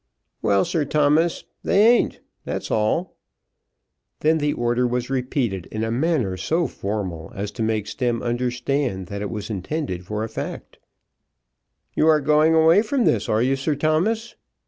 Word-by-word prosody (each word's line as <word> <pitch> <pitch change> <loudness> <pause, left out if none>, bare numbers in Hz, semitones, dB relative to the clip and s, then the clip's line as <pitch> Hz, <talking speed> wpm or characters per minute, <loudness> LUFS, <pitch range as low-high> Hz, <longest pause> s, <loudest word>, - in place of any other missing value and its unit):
"Well, 100 -2 +3
Sir 160 - 0
Thomas; 150 +3 +2 0.2
they 200 +2 +4
ain't; 240 0 +3 0.2
that's - - -4
all." 110 +12 0 1.0
Then 160 +1 +3
the 145 0 +1
order 120 +1 +1
was 125 +1 -2
repeated 125 - -1
in 110 0 -4
a 115 - -1
manner 125 - 0
so 165 - 0
formal, 95 - -4
as 100 +1 -4
to 115 - -7
make 110 -2 0
Stemm 120 -1 -2
understand 125 -3 -1
that 100 0 -5
it 105 - -3
was 105 0 -5
intended 95 - -4
for 105 0 -2
a - - -2
fact. - - -7 1.1
"You 155 - +2
are 155 -1 +5
going 150 +2 +3
away 160 +5 +6
from 240 +3 0
this; 110 -3 +1
are 110 +2 +2
you, 135 +2 +2
Sir 140 +3 -1
Thomas?" 170 +11 0
125 Hz, 160 wpm, -23 LUFS, 105-155 Hz, 1.1 s, away